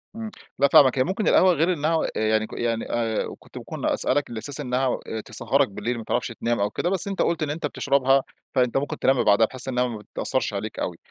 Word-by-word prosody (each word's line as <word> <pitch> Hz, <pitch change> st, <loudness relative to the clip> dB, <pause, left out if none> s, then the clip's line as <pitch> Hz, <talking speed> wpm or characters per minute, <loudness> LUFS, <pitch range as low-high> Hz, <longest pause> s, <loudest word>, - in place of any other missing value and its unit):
إمم، 225 Hz, -1 st, -6 dB, 0.3 s
لأ 140 Hz, -, +5 dB
فاهمك، 135 Hz, -2 st, +6 dB
هي -, -, +5 dB
ممكن 190 Hz, +8 st, -2 dB
القهوة 185 Hz, -1 st, +5 dB
غير 170 Hz, +3 st, +2 dB
إنها 160 Hz, +1 st, 0 dB, 0.2 s
يعني 110 Hz, 0 st, +1 dB
ك -, -, -13 dB
يعني 115 Hz, -1 st, -2 dB
آآ، 115 Hz, -2 st, -2 dB
كنت -, -, -14 dB
ممكن -, -, -6 dB
أسألك 145 Hz, +2 st, +1 dB
على 115 Hz, -2 st, -5 dB
أساس 135 Hz, +6 st, -4 dB
إنها 130 Hz, -1 st, -1 dB, 0.3 s
تسهَّرك 120 Hz, +5 st, +1 dB
بالليل، 105 Hz, +5 st, -3 dB
ما 115 Hz, -, -6 dB
تعرفش -, -, -1 dB
تنام 120 Hz, 0 st, -2 dB
أو 100 Hz, +1 st, +1 dB
كده، 170 Hz, -, -2 dB
بس 195 Hz, +2 st, +2 dB
أنت 195 Hz, -1 st, -2 dB
قُلت 165 Hz, -2 st, 0 dB
إن 145 Hz, -, -2 dB
أنت 155 Hz, +1 st, -3 dB
بتشربها، 135 Hz, -2 st, +2 dB, 0.3 s
فأنت 125 Hz, 0 st, +2 dB
ممكن 140 Hz, +1 st, -3 dB
تنام 135 Hz, -1 st, +2 dB
بعدها، 105 Hz, +2 st, +5 dB
بحيث 130 Hz, +3 st, -1 dB
إنها 125 Hz, -1 st, 0 dB
ما 115 Hz, -, -5 dB
بتأثرش 105 Hz, +3 st, -1 dB
عليك 105 Hz, +2 st, -5 dB
أوي. 85 Hz, -, -3 dB
130 Hz, 220 wpm, -24 LUFS, 115-145 Hz, 0.3 s, فاهمك